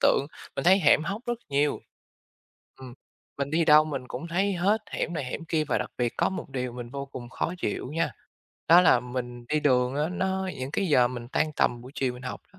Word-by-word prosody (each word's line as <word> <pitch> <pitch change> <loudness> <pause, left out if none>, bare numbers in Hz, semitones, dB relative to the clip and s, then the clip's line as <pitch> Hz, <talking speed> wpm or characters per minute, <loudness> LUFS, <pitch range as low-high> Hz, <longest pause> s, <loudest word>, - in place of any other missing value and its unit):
tượng, 140 - +3 0.3
mình - - -2
thấy 190 +3 +6
hẻm 155 - +5
hóc 200 +8 -4
rất 240 -1 -1
nhiều. 145 +1 +1 1.0
Ừm, 125 -2 -9 0.4
mình 140 0 -2
đi 165 +2 +2
đâu 155 -1 +7
mình 140 -4 -5
cũng 160 +7 -6
thấy 195 +4 +1
hết 200 +5 +1
hẻm - - -2
này 145 -4 -2
hẻm 135 +5 -5
kia 160 -2 0
và - - 0
đặc 125 - -4
biệt 120 -1 0
có - - +2
một 190 - -6
điều 125 -2 -3
mình 120 -1 -7
vô 140 +1 -5
cùng 125 -3 -9
khó 170 - -2
chịu 130 - -3
nha. 165 - 0 0.6
Đó 170 +3 +9
là 150 -8 +5
mình 125 0 -6
đi 150 0 +1
đường 125 -3 +2
á 150 +2 0
nó 190 +1 -1
những 130 +1 -4
cái 195 - 0
giờ 125 -4 +5
mình 120 -1 -7
tan 155 +3 0
tầm 120 - +1
buổi 130 +3 -11
chiều 130 -2 0
mình 125 - -11
học 125 - -5
đó, 190 - -20
145 Hz, 235 wpm, -27 LUFS, 125-170 Hz, 1.0 s, Đó